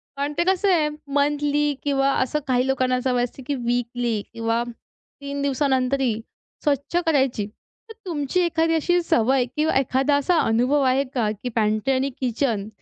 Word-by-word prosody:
कारण 285 Hz, +1 st, -2 dB
ते 345 Hz, -, +3 dB
कसं 380 Hz, +2 st, +2 dB
आहे 305 Hz, -3 st, +2 dB, 0.2 s
मंथली 290 Hz, 0 st, +1 dB
किंवा 275 Hz, -1 st, +2 dB
असं 280 Hz, +4 st, 0 dB
काही 255 Hz, 0 st, +2 dB
लोकांना 255 Hz, -1 st, +1 dB
असं 255 Hz, +1 st, -1 dB
सवय 245 Hz, -1 st, +1 dB
असते, 250 Hz, +2 st, -6 dB
की 285 Hz, -, 0 dB
वीकली 240 Hz, -2 st, -1 dB
किंवा 230 Hz, 0 st, 0 dB, 0.6 s
3 280 Hz, 0 st, -4 dB
दिवसांनंतर 270 Hz, -1 st, +1 dB, 0.6 s
स्वच्छ 285 Hz, +2 st, -1 dB
करायची. 265 Hz, -9 st, +1 dB, 0.4 s
तर 445 Hz, -, -8 dB
तुमची 310 Hz, 0 st, -1 dB
एखादी 330 Hz, -1 st, +1 dB
अशी 350 Hz, +3 st, +2 dB
सवय 255 Hz, -3 st, +2 dB
किंवा 310 Hz, +1 st, +1 dB
एखादा 270 Hz, +2 st, +1 dB
असा 330 Hz, +5 st, +1 dB
अनुभव 250 Hz, +6 st, +2 dB
आहे 260 Hz, +2 st, +3 dB
का, 225 Hz, -5 st, +1 dB
की 215 Hz, +4 st, -5 dB
पॅन्ट्री 215 Hz, +4 st, +1 dB
आणि 265 Hz, +2 st, 0 dB
किचन 235 Hz, -4 st, -1 dB
270 Hz, 160 wpm, -23 LUFS, 245-295 Hz, 0.6 s, ते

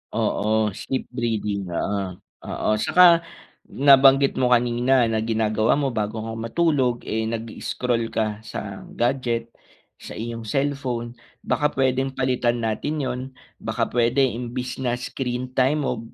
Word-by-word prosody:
Oo, 110 Hz, 0 st, +1 dB
sleep 130 Hz, +7 st, -4 dB
breathing 105 Hz, -5 st, -2 dB
oo, 95 Hz, +1 st, -2 dB, 0.3 s
oo -, -, -1 dB
'saka 170 Hz, +3 st, +5 dB, 0.4 s
nabanggit 135 Hz, 0 st, +5 dB
mo 130 Hz, -, +3 dB
kanina 120 Hz, +2 st, +2 dB
na 115 Hz, -1 st, +1 dB
ginagawa 110 Hz, 0 st, +1 dB
mo 140 Hz, -2 st, 0 dB
bago 110 Hz, -1 st, -3 dB
ka 115 Hz, -, -5 dB
matulog, 130 Hz, 0 st, +1 dB
eh, 110 Hz, 0 st, -2 dB
nag-i-scroll 115 Hz, +1 st, -2 dB
ka 110 Hz, -2 st, -2 dB
sa 100 Hz, -3 st, -7 dB
gadget 120 Hz, -2 st, -1 dB, 0.5 s
sa -, -, -9 dB
iyong 115 Hz, 0 st, -5 dB
cellphone 130 Hz, -2 st, -2 dB, 0.3 s
baka 150 Hz, -, +1 dB
puwedeng 130 Hz, 0 st, +1 dB
palitan 125 Hz, -2 st, 0 dB
natin 140 Hz, +7 st, -2 dB
'yon. 125 Hz, -1 st, -2 dB, 0.4 s
Baka -, -, -2 dB
puwede 120 Hz, +3 st, +2 dB
imbis 125 Hz, 0 st, -3 dB
na 125 Hz, -2 st, 0 dB
screen 125 Hz, 0 st, -4 dB
time 135 Hz, +4 st, +2 dB
o 125 Hz, -3 st, -1 dB
120 Hz, 130 wpm, -23 LUFS, 110-130 Hz, 0.5 s, saka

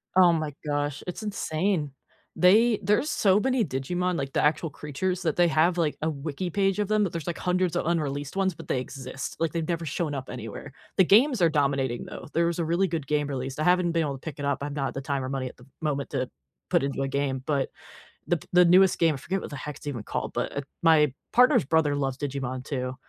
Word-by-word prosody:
Oh 180 Hz, -2 st, +7 dB
my 155 Hz, -3 st, -2 dB
gosh. 145 Hz, -1 st, -2 dB
It's 180 Hz, +5 st, -5 dB
insane. 180 Hz, -5 st, -1 dB, 0.4 s
They 215 Hz, +5 st, +5 dB
there's 210 Hz, +9 st, +2 dB
so 200 Hz, -6 st, +3 dB
many 255 Hz, -2 st, +1 dB
Digimon, 175 Hz, +6 st, -1 dB
like, 135 Hz, 0 st, -3 dB
the -, -, +1 dB
actual 155 Hz, +2 st, +2 dB
creatures 175 Hz, +6 st, -3 dB
that 160 Hz, -3 st, 0 dB
they 175 Hz, -1 st, +4 dB
have, 160 Hz, +3 st, +3 dB
like, 160 Hz, -3 st, 0 dB
a 160 Hz, -, +1 dB
wiki 155 Hz, +4 st, -4 dB
page 195 Hz, +1 st, +1 dB
of 205 Hz, -, +1 dB
them, 215 Hz, 0 st, +2 dB
but 185 Hz, -, -1 dB
there's, 165 Hz, -3 st, -5 dB
like, 170 Hz, -, -2 dB
hundreds 180 Hz, -2 st, 0 dB
of -, -, 0 dB
unreleased 145 Hz, -2 st, -2 dB
ones, 190 Hz, -2 st, +2 dB
but -, -, -12 dB
they 130 Hz, -, +1 dB
exist, 130 Hz, 0 st, -6 dB
like, 165 Hz, -2 st, 0 dB
they've 165 Hz, -1 st, -2 dB
never 170 Hz, -1 st, -2 dB
shown 150 Hz, 0 st, -2 dB
up 135 Hz, -1 st, -6 dB
anywhere. 125 Hz, +3 st, -7 dB, 0.2 s
The 190 Hz, -, +6 dB
games 235 Hz, -, +4 dB
are 170 Hz, -, +5 dB
dominating, 135 Hz, -5 st, 0 dB
though. -, -, -9 dB
There 170 Hz, -, +3 dB
was 170 Hz, 0 st, -1 dB
a -, -, +1 dB
really 170 Hz, +4 st, +1 dB
good 160 Hz, -4 st, -3 dB
game 150 Hz, 0 st, 0 dB
released, 135 Hz, 0 st, -4 dB
I -, -, +1 dB
haven't 180 Hz, -1 st, +3 dB
been 165 Hz, -1 st, +1 dB
able 145 Hz, -2 st, -2 dB
to 135 Hz, -, -8 dB
pick 155 Hz, -3 st, -6 dB
it 145 Hz, -, -3 dB
up, 140 Hz, -1 st, 0 dB
I'm 145 Hz, 0 st, -4 dB
not 140 Hz, -2 st, -1 dB
at -, -, -9 dB
the 135 Hz, -, -4 dB
time 135 Hz, -1 st, -2 dB
or -, -, -3 dB
money 130 Hz, -2 st, -2 dB
at -, -, -16 dB
the 125 Hz, -, -16 dB, 0.2 s
moment 145 Hz, -3 st, -1 dB
to 130 Hz, 0 st, -2 dB, 0.4 s
put -, -, +3 dB
into 140 Hz, 0 st, -2 dB
a 135 Hz, -, 0 dB
game, 135 Hz, -1 st, -1 dB
but 140 Hz, -3 st, 0 dB, 0.6 s
the 175 Hz, -, +2 dB
p 155 Hz, -, -13 dB
the 180 Hz, 0 st, +6 dB
newest 185 Hz, +2 st, +5 dB
game 165 Hz, -2 st, +3 dB
I -, -, -4 dB
forget 185 Hz, +8 st, -3 dB
what -, -, -6 dB
the 145 Hz, -, -6 dB
heck 150 Hz, +2 st, -6 dB
it's -, -, -14 dB
even 130 Hz, -7 st, -3 dB
called -, -, -4 dB
but, -, -, -2 dB
uh, -, -, +1 dB, 0.2 s
my 155 Hz, -4 st, +5 dB, 0.2 s
partner's 250 Hz, -, +5 dB
brother 150 Hz, 0 st, +2 dB
loves 135 Hz, -2 st, -2 dB
Digimon 130 Hz, -3 st, -3 dB
too, 130 Hz, -3 st, -3 dB
155 Hz, 250 wpm, -26 LUFS, 140-180 Hz, 0.6 s, Oh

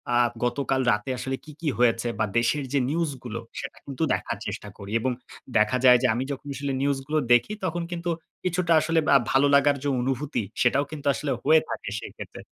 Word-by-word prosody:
আ -, -, +5 dB, 0.3 s
গতকাল 130 Hz, +2 st, 0 dB
রাতে 105 Hz, +5 st, -1 dB
আসলে 130 Hz, +2 st, -3 dB
কী, 155 Hz, -, -11 dB
কী 155 Hz, -, 0 dB
হয়েছে 120 Hz, -1 st, +3 dB
বা 110 Hz, -, +3 dB
দেশের 135 Hz, +5 st, +1 dB
যে 140 Hz, -, +3 dB
নিউজ 165 Hz, 0 st, 0 dB
গুলো 115 Hz, -1 st, -5 dB, 0.2 s
সেটা -, -, -7 dB
কিন্তু 140 Hz, +3 st, -3 dB
দেখার -, -, -2 dB
চেষ্টা -, -, -5 dB
করি 100 Hz, +1 st, -9 dB
এবং 130 Hz, +2 st, 0 dB, 0.5 s
দেখা 105 Hz, +4 st, +3 dB
যায় 125 Hz, -1 st, +9 dB
যে -, -, +5 dB
আমি 125 Hz, +3 st, -1 dB
যখন 140 Hz, +1 st, -6 dB
আসলে 140 Hz, -1 st, -3 dB
নিউজগুলো 140 Hz, +2 st, 0 dB, 0.2 s
দেখি 120 Hz, -, +3 dB
তখন 175 Hz, -1 st, -2 dB
কিন্তু 175 Hz, 0 st, -3 dB, 0.3 s
কিছুটা 180 Hz, -1 st, +1 dB
আসলে 160 Hz, +1 st, +2 dB, 0.2 s
আ -, -, +10 dB
ভালো 135 Hz, +2 st, +4 dB
লাগার 140 Hz, 0 st, +4 dB
যে -, -, -1 dB
অনুভূতি 135 Hz, 0 st, -1 dB, 0.2 s
সেটাও 135 Hz, +3 st, +3 dB
কিন্তু 145 Hz, -2 st, -5 dB
আসলে 145 Hz, -3 st, -3 dB
হয়ে 160 Hz, 0 st, +5 dB
থাকে -, -, -4 dB
সেক্ষেত্রে। -, -, -9 dB
140 Hz, 195 wpm, -25 LUFS, 125-155 Hz, 0.5 s, আ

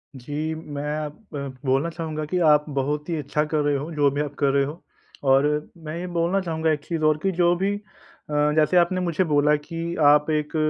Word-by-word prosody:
जी, 145 Hz, +5 st, -4 dB
मैं 150 Hz, -3 st, -6 dB, 0.2 s
अब 150 Hz, +9 st, -11 dB
ब 140 Hz, -2 st, -5 dB
बोलना 135 Hz, +5 st, +2 dB
चाहूँगा 160 Hz, -2 st, -4 dB
कि 180 Hz, +5 st, -2 dB
आप 150 Hz, 0 st, +5 dB
बहुत 150 Hz, +4 st, -1 dB
ही 165 Hz, -, 0 dB
अच्छा 150 Hz, +1 st, -1 dB
कर 155 Hz, +1 st, -1 dB
रहे 145 Hz, 0 st, +1 dB
हो 150 Hz, +5 st, -5 dB
जो 145 Hz, -2 st, +3 dB
भी 145 Hz, +2 st, -1 dB
आप 145 Hz, -1 st, -4 dB
कर 140 Hz, -2 st, +3 dB
रहे 140 Hz, 0 st, +3 dB
हो 155 Hz, +5 st, -7 dB, 0.5 s
और 135 Hz, +2 st, +5 dB, 0.4 s
मैं 155 Hz, +2 st, -5 dB
ये 175 Hz, -, -4 dB
बोलना 175 Hz, +2 st, 0 dB
चाहूँगा 160 Hz, -3 st, 0 dB
एक 150 Hz, -1 st, -2 dB
चीज़ 165 Hz, -2 st, -3 dB
और 155 Hz, -1 st, +4 dB
की 195 Hz, -, +2 dB
जो 175 Hz, 0 st, +3 dB
भी 195 Hz, +3 st, 0 dB
अ, 205 Hz, -, -8 dB, 0.7 s
जैसे 155 Hz, +3 st, +3 dB
आपने 180 Hz, +1 st, +3 dB
मुझे 175 Hz, 0 st, +1 dB
बोला 150 Hz, -2 st, +3 dB
कि 165 Hz, +3 st, -5 dB
आप 150 Hz, +1 st, +5 dB
एक 150 Hz, +1 st, -1 dB
155 Hz, 220 wpm, -24 LUFS, 145-170 Hz, 0.7 s, आप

